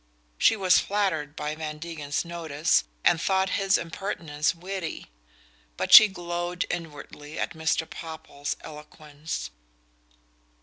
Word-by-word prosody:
She - - +5
was 190 -3 +4
flattered 170 -8 -1
by 150 -1 -3
Van 155 -1 -5
Degen's 150 -2 -4
notice, 165 - 0 0.2
and 165 - +4
thought 190 0 +1
his 195 0 +2
impertinence 165 -3 -2
witty; 180 - -6 0.7
but - - -1
she 215 - +12
glowed 175 -1 -3
inwardly 150 -2 -7
at - - -2
Mr. 160 0 0
Popple's 160 -3 -6
eloquence. 150 - -7
165 Hz, 115 wpm, -26 LUFS, 150-180 Hz, 0.7 s, she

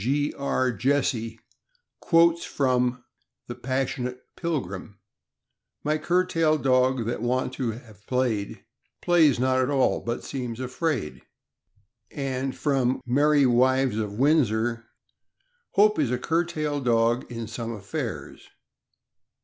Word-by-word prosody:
G. 145 +4 0
R. 130 -2 0
Jesse 120 -4 -1 0.6
quotes 170 0 +3
from 125 -2 0 0.4
the - - -6
"Passionate 125 -1 -3 0.2
Pilgrim: 105 - -4 0.4
" - - -56
My 155 +1 0
curtail 165 -2 +2
dog 130 -3 +2
that 120 0 -3
wont 125 +2 -1
to 130 -4 -2
have 110 -3 -15
play'd, 120 -6 -1 0.4
Plays 160 -7 +4
not 130 +1 +2
at 130 - +1
all, 135 -2 +2
but 120 +1 -4
seems 125 -4 -5
afraid. 130 - -3 0.9
And 135 -1 -3
from 135 -3 0
" - - -46
Merry 145 +3 +3
Wives 130 -1 +3
of 105 -2 -2
Windsor: 120 -3 +1 0.4
" - - -46
Hope 210 0 +4
is 140 -6 +1
a 125 - 0
curtail 155 0 -1
dog 120 0 +1
in 115 -1 -5
some 115 +1 -5
affairs. 105 -4 -6
130 Hz, 125 wpm, -25 LUFS, 120-145 Hz, 0.9 s, Plays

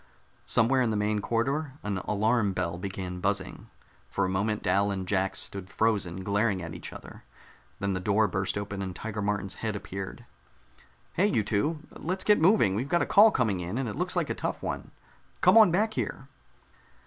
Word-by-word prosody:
Somewhere 130 +4 +3
in 120 - +2
the 110 - 0
main 105 0 +1
corridor 135 +7 -1
an 100 -2 -2
alarm 105 +1 +1
bell 85 -1 -2
began 95 -1 -5
buzzing. 95 -1 -2 0.4
For - - 0
a - - -1
moment 105 +3 -1
Dal 100 +1 +2
and 95 -2 -3
Jack 95 -1 0
stood 95 -1 -6
frozen, 95 -5 0
glaring 100 0 +1
at 85 -2 -6
each 85 - -7
other. - - -11 0.6
Then 100 0 -1
the 95 - -1
door 105 +3 +2
burst 95 0 -2
open 100 -1 -4
and 95 -2 -4
Tiger 110 +1 -5
Martin's 100 -1 -1
head 110 -2 -2
appeared. 95 -1 -6 0.9
"Hey, 190 +4 +3
you 115 - +1
two, 150 +11 0
let's 185 +3 -3
get 210 -6 +4
moving! 170 - +5
We've 120 +8 -2
got 175 - +3
a - - -1
call 210 +3 +7
coming 110 - 0
in, 90 +6 -4
and 135 -2 -1
it 105 - -4
looks - - -2
like - - 0
a - - +1
tough - - -4
one. - - -4 0.5
Come 185 +3 +6
on 220 -4 +8
back 215 +6 +1
here!" 135 - -4
105 Hz, 195 wpm, -28 LUFS, 95-125 Hz, 0.9 s, on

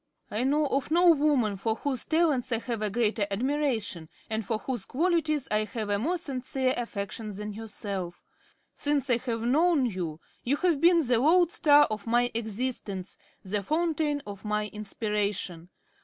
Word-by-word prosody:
I 215 - -1
know 295 +3 +2
of 275 0 -1
no 345 +2 +6
woman 280 -9 +2
for 220 +3 -1
whose 260 0 -3
talents 310 -7 +1
I 230 - +3
have 230 -1 -4
a 215 - 0
greater 215 -1 0
admiration 225 - -1 0.2
or 220 0 0
for 220 +1 -2
whose 245 +3 -4
qualities 310 -2 +1
I 215 0 +2
have 215 0 -4
a 200 - +1
more 335 - 0
sincere 260 -4 -2
affection 215 -2 -4
than 210 +1 -5
yourself. 200 -4 -6 0.5
Since 285 -2 0
I 235 - +5
have 230 -2 -3
known 295 +3 +3
you, 175 -8 -3 0.2
you 265 +4 +1
have 340 -5 +1
been 340 -2 +5
the 240 -2 +3
lodestar 305 -1 +5
of 215 +1 -4
my 240 +1 +2
existence, 220 -4 -3 0.3
the 205 +1 -2
fountain 305 - 0
of 200 -2 -8
my 210 0 -1
inspiration. 205 -5 -3
240 Hz, 160 wpm, -28 LUFS, 210-290 Hz, 0.5 s, no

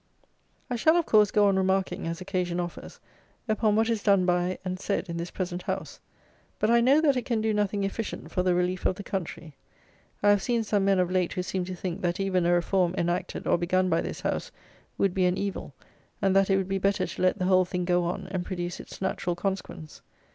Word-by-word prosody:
I 245 - -2
shall, 315 +8 +4
of 340 - +1
course, 210 -2 +5
go 210 0 +3
on 195 -1 +2
remarking, 190 -2 0
as 170 +2 -4
occasion 180 -2 -2
offers, 175 -1 -6 0.5
upon 215 -1 +2
what 220 +1 +3
is 225 -3 0
done 195 -3 +3
by 180 0 +1
and 185 0 -3
said 200 -1 -2
in 170 - -4
this 170 +1 -4
present 180 -1 -4
House; - - -5 0.6
but 215 - +1
I 235 0 +5
know 270 +6 +5
that 290 -4 +3
it 250 - -2
can 235 -3 0
do 220 0 0
nothing 205 -1 0
efficient 200 +3 -4
for 180 - 0
the 180 -1 +2
relief 180 +1 0
of - - 0
the 200 - -8
country. 170 -5 -5 0.7
I 205 - +6
have 205 -1 +3
seen 235 0 0
some 205 -2 +1
men 195 -1 +3
of 180 -1 +1
late, 185 -2 +1
who 180 - -2
seem 185 0 -2
to 185 0 -5
think, 180 +1 -5
that 175 0 -1
even 185 -3 +1
a - - +3
reform, 175 0 +1
enacted, 175 +1 -2
or - - +2
begun, 185 +2 +1
by - - +2
this - - -5
House, - - -2 0.5
would 195 -2 +1
be 185 -1 +2
an 180 +1 +1
evil; 200 -1 -4 0.5
and 195 -1 +2
that 195 0 +4
it 195 - +4
would 190 -1 -1
be 195 0 -1
better 195 +1 +1
to - - -7
let 185 +2 +3
the 185 - -1
whole 185 0 +5
thing 180 0 -3
go 175 -1 +2
on, 175 - -3
and 185 -2 -2
produce 175 -1 -4
its - - -9
natural 180 -2 -1
consequence. 180 -4 -5
185 Hz, 235 wpm, -27 LUFS, 180-205 Hz, 0.7 s, I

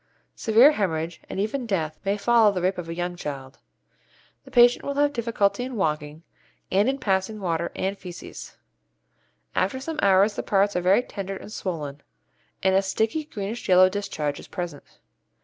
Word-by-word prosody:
Severe 235 +7 +5
hæmorrhage, 165 - -2
and - - -4
even 235 +5 -2
death, 160 -7 -2
may 200 +1 0
follow 225 0 +4
the 190 - -2
rape 185 0 +1
of 165 -1 -6
a 165 - -4
young 175 0 -3
child. 135 -5 -7 0.9
The - - -13
patient 245 0 +5
will 280 - -3
have 290 0 +2
difficulty 230 -3 0
in 255 0 -5
walking, 150 -4 -2 0.5
and 200 +6 +3
in 270 - -1
passing 205 -3 -1
water 170 -3 -2
and 195 +1 -1
fæces. 180 -3 -10 1.0
After 200 +8 0
some 310 +3 -5
hours 200 +2 +4
the - - -2
parts 200 0 +1
are 180 - +1
very 190 +7 +4
tender 195 -4 -6
and 210 - -11
swollen, 150 -6 -5 0.6
and 190 0 +3
a 190 - +4
sticky 220 +10 -1
greenish 210 -4 -6
yellow 185 0 +7
discharge 155 -7 -3
is - - -11
present. 175 -6 -6
195 Hz, 170 wpm, -25 LUFS, 175-220 Hz, 1.0 s, yellow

